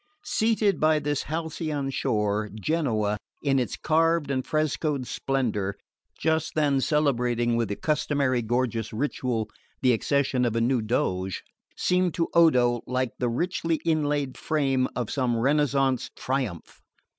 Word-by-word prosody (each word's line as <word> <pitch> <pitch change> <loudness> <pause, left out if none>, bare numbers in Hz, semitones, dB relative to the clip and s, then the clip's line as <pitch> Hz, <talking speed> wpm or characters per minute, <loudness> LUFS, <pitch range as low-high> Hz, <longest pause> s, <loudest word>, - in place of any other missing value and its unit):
Seated 215 -5 +1
by 155 0 +4
this 145 -1 -1
halcyon 155 -3 -3
shore, 105 -3 0
Genoa, 110 - 0 0.2
in 135 -2 +2
its 125 - -2
carved 165 -2 +2
and 130 -1 0
frescoed 155 -2 -1
splendour, 115 -8 -1 0.4
just 160 0 0
then 145 -3 +2
celebrating 125 -5 +1
with 115 -1 +1
the 100 - -2
customary 140 -4 0
gorgeous 115 -1 -1
ritual 120 -2 -2 0.4
the 125 -1 +5
accession 135 +1 +1
of 120 -2 0
a - - +2
new 120 +1 +2
Doge, 95 -4 -1 0.3
seemed 180 -2 +1
to 165 - 0
Odo 125 -8 +4
like 125 -1 -1
the 125 - +1
richly 165 +5 0
inlaid 145 -4 0
frame 135 -4 +1
of 120 -4 -3
some 125 -4 0
Renaissance 135 0 +1
"triumph." 125 - -3
135 Hz, 135 wpm, -26 LUFS, 120-155 Hz, 0.4 s, the